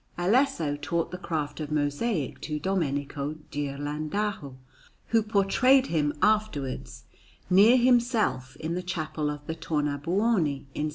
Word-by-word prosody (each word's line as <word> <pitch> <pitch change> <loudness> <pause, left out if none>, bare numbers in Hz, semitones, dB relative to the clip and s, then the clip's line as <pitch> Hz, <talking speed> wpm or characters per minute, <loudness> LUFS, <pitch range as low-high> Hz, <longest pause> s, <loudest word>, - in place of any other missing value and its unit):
Alesso 175 - +2
taught 165 +3 -1
the 180 - -5
craft 155 -5 -3
of 155 -1 -5
mosaic 145 - -1
to 150 -1 -3
Domenico 145 -4 -2 0.2
Ghirlandajo, 145 +3 -3 0.5
who 225 -1 +4
portrayed 220 +6 +3
him 150 -2 +2
afterwards 150 - 0 0.5
near 210 +7 +7
himself 235 - +2
in 160 +1 -4
the 180 - -2
Chapel 155 -4 -3
of 145 0 -6
the 160 - -3
Tornabuoni 160 +2 0
in 150 - -1
S. - - -2
160 Hz, 125 wpm, -27 LUFS, 145-205 Hz, 0.5 s, near